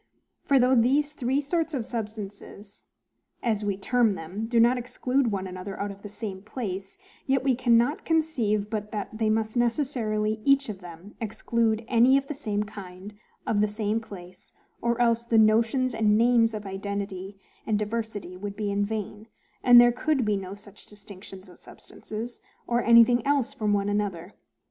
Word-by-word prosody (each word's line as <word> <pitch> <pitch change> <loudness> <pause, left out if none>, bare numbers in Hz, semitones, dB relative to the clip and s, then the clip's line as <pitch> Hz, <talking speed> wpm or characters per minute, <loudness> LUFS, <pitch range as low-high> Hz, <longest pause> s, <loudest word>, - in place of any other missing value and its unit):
For, 280 - +2
though 255 0 +4
these 275 +5 +3
three 265 0 0
sorts 325 +2 -1
of 240 -4 -2
substances, 210 -2 -8 0.6
as 220 -3 0
we 200 -2 -1
term 230 0 +2
them, 190 +7 -5
do 235 0 +2
not 240 +2 +5
exclude 250 +1 -1
one 195 -1 -2
another 185 +1 -7
out 200 0 -2
of 200 0 -12
the 205 - -8
same 200 -2 -6
place, 195 -4 -6 0.3
yet 265 -1 +2
we 270 -1 +3
cannot 240 +3 +2
conceive 250 -11 0
but 210 -1 -4
that 210 0 -5
they 220 0 0
must 220 0 0
necessarily 230 -4 0
each 275 -2 +3
of 200 -3 -6
them 175 +2 -12
exclude 225 0 -1
any 245 +3 +5
of 275 - -1
the 300 - -5
same 210 -7 -2
kind 200 -1 -10 0.3
out 215 - 0
of - - +3
the 210 - +3
same 210 +1 -1
place: 185 -4 -12 0.3
or 235 0 0
else 235 -1 +2
the 235 -1 +1
notions 225 +4 +3
and 215 -2 +3
names 230 -1 +3
of 210 -1 -6
identity 195 0 -5 0.3
and 215 -2 +2
diversity 210 -3 -4
would 200 +2 -6
be 205 -1 -2
in 200 0 0
vain, 215 0 -5 0.4
and 245 -1 +9
there 240 0 +7
could 265 +1 0
be 210 -1 +1
no 195 0 -5
such 205 0 -15
distinctions 195 -2 -12
of 180 - -16
substances, 225 +3 -9 0.2
or 240 0 +1
anything 235 0 +6
else 280 -2 +1
one 215 -1 0
from 200 - +2
another. 205 -3 -2
220 Hz, 175 wpm, -26 LUFS, 205-240 Hz, 0.6 s, and